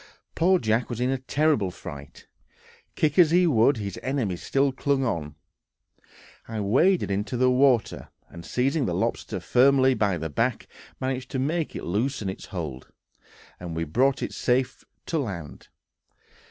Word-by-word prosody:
Poor 185 Hz, +3 st, +3 dB
Jack 110 Hz, -4 st, 0 dB
was 120 Hz, -2 st, -4 dB
in 125 Hz, +1 st, +1 dB
a 135 Hz, -, -1 dB
terrible 140 Hz, -6 st, +1 dB
fright; 70 Hz, -5 st, -10 dB, 0.7 s
kick 150 Hz, +1 st, +1 dB
as 170 Hz, -3 st, +7 dB
he 180 Hz, +2 st, +4 dB
would, 140 Hz, -3 st, +3 dB
his 100 Hz, -3 st, -5 dB
enemy 130 Hz, -9 st, -1 dB
still 135 Hz, +9 st, 0 dB
clung 135 Hz, +1 st, 0 dB
on. 75 Hz, -, -3 dB, 1.1 s
I 110 Hz, -1 st, -4 dB
waded 130 Hz, -, +2 dB
into 100 Hz, +4 st, -2 dB
the 125 Hz, +1 st, +3 dB
water, 125 Hz, -3 st, +2 dB, 0.2 s
and 85 Hz, -1 st, -11 dB
seizing 135 Hz, -, 0 dB
the -, -, -1 dB
lobster -, -, -2 dB
firmly 130 Hz, +1 st, +4 dB
by 100 Hz, -6 st, 0 dB
the 80 Hz, 0 st, -4 dB
back, -, -, -1 dB, 0.3 s
managed 130 Hz, -1 st, -3 dB
to -, -, -3 dB
make 155 Hz, +5 st, -1 dB
it -, -, -5 dB
loosen 110 Hz, +3 st, -1 dB
its 95 Hz, -, -7 dB
hold, 80 Hz, -9 st, -6 dB, 0.7 s
and 85 Hz, -2 st, -6 dB
we 80 Hz, -, -1 dB
brought 130 Hz, -, +1 dB
it -, -, -4 dB
safe 125 Hz, +1 st, 0 dB, 0.2 s
to 165 Hz, -, -1 dB
land. 90 Hz, -, -6 dB
125 Hz, 155 wpm, -25 LUFS, 100-140 Hz, 1.1 s, as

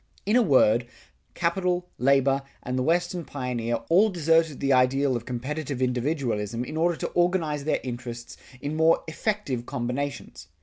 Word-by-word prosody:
In 210 Hz, +3 st, +2 dB
a 250 Hz, -, +6 dB
word, 125 Hz, -, +4 dB, 0.5 s
capital, 180 Hz, +1 st, 0 dB
labor, 135 Hz, +1 st, +3 dB, 0.2 s
and 125 Hz, -, -3 dB
the 130 Hz, -, 0 dB
Western 175 Hz, +4 st, 0 dB
pioneer, 125 Hz, -5 st, -3 dB
all 195 Hz, +6 st, +5 dB
deserted 165 Hz, -4 st, +2 dB
the 140 Hz, 0 st, +2 dB
ideal 130 Hz, +1 st, +3 dB
of 120 Hz, 0 st, -5 dB
competitive 135 Hz, +2 st, -4 dB
individualism 125 Hz, -4 st, -1 dB
in 155 Hz, -, -7 dB
order 170 Hz, +2 st, +2 dB
to -, -, -3 dB
organize 170 Hz, -5 st, 0 dB
their 155 Hz, -, +1 dB
interests 120 Hz, -1 st, -6 dB, 0.3 s
in 145 Hz, +2 st, -3 dB
more 160 Hz, +1 st, +3 dB
effective 160 Hz, -, -2 dB
combinations. 125 Hz, +4 st, -4 dB
140 Hz, 145 wpm, -26 LUFS, 125-165 Hz, 0.5 s, a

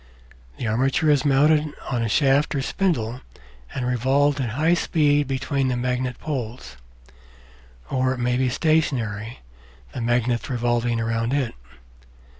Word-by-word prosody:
The -, -, -4 dB
armature 135 Hz, +8 st, +2 dB
is 145 Hz, -1 st, +3 dB
mounted 150 Hz, +2 st, +3 dB, 0.2 s
on 120 Hz, -2 st, 0 dB
a 115 Hz, -, -1 dB
shaft 140 Hz, +4 st, +2 dB
or 135 Hz, -, -1 dB
spindle 130 Hz, -, -1 dB, 0.5 s
and 125 Hz, -, -3 dB
revolved 135 Hz, +4 st, +2 dB
at 125 Hz, -, -2 dB
high 155 Hz, +8 st, +2 dB
speed 145 Hz, -4 st, +2 dB
between 135 Hz, 0 st, -1 dB
the 125 Hz, -1 st, 0 dB
magnet 125 Hz, 0 st, -2 dB
poles; 125 Hz, -, -5 dB, 1.1 s
or 130 Hz, 0 st, 0 dB
it -, -, -9 dB
may 125 Hz, 0 st, +1 dB
be 130 Hz, 0 st, +1 dB
stationary, 120 Hz, -7 st, 0 dB, 0.5 s
the 125 Hz, -, -4 dB
magnets 120 Hz, +1 st, 0 dB
revolving 120 Hz, -1 st, 0 dB
round 115 Hz, +2 st, -1 dB
it. 135 Hz, -5 st, -1 dB
130 Hz, 135 wpm, -23 LUFS, 120-145 Hz, 1.1 s, is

